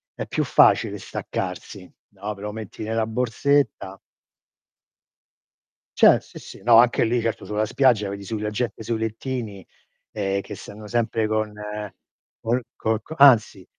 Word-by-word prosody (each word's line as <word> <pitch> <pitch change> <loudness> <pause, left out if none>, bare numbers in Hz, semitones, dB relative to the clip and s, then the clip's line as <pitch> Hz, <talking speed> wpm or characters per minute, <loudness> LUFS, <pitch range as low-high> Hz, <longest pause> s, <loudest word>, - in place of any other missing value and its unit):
è - - -5
più - - -1
facile - - +3
staccarsi, - - -6 0.2
no, 105 +2 -6
però 105 +1 -6
metti 110 -1 -8
nella 110 +1 -1
borsetta. 120 -3 0 2.0
Cer - - +6
sì, - - -12
sì. - - -12
No, 115 -1 +6
anche 120 +1 +5
lì, 120 +1 +1
certo 115 0 -3
sulla 105 +1 -1
spiaggia 115 -3 +2
vedi 100 0 -6
sui 105 +1 -5
la 105 - -2
gente 110 0 -3
sui 115 +1 -2
lettini, 110 -2 -4 0.5
ehm, 100 -2 -1
che 105 - -9
stanno 105 +2 -11
sempre 115 -1 0
con 110 -1 -1 0.9
col 120 +2 0
co 110 -1 -1
co 135 - -10
anzi, 115 -9 +5
110 Hz, 145 wpm, -23 LUFS, 105-120 Hz, 2.0 s, Cer